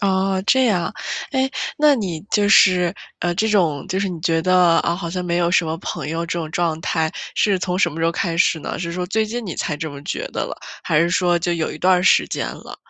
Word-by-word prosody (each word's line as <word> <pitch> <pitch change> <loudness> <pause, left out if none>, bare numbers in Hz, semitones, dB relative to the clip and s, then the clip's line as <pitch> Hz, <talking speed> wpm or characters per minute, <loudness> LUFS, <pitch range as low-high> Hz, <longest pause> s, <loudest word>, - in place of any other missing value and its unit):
啊， 190 -1 +1
这 260 +5 +3
样。 185 -7 0 0.4
哎， 265 -1 0 0.3
那 300 -1 +5
你 185 - -3
就 205 -1 +2
是， 180 -3 +5 0.3
呃， 175 0 0
这 220 +5 0
种， 165 -9 +1
就 190 - -1
是 195 - -1
你 170 -3 -6
觉 165 -2 +1
得， 180 -2 +4
啊， 170 - 0
好 170 -3 -5
像 180 +1 -4
没 170 0 -1
有 170 -1 +1
什 175 -1 +3
么 160 +1 -3
朋 150 -5 -5
友 165 +1 -2
这 170 - -3
种 160 -2 -5
状 165 -1 -1
态 160 -1 -1 0.2
是 200 -3 +2
从 180 0 -2
什 175 - +3
么 165 - -6
时 165 - +1
候 165 - +3
开 170 -1 -2
始 170 -1 +3
呢？ - - -5
是 170 -1 -4
说 180 0 -3
最 220 +3 0
近 235 +2 -5
你 175 - -4
才 150 - -2
这 160 +1 -4
么 140 0 -10
觉 - - -4
得 - - -5
了， - - -6 0.3
还 150 - +1
是 170 +1 +2
说 175 -1 +2
就 175 +1 -1
有 165 -2 -2
一 - - -8
段 185 +1 +4
儿 - - -2
时 190 - +4
间 - - -3
了？ - - -10
175 Hz, 280 characters per minute, -20 LUFS, 165-190 Hz, 0.4 s, 那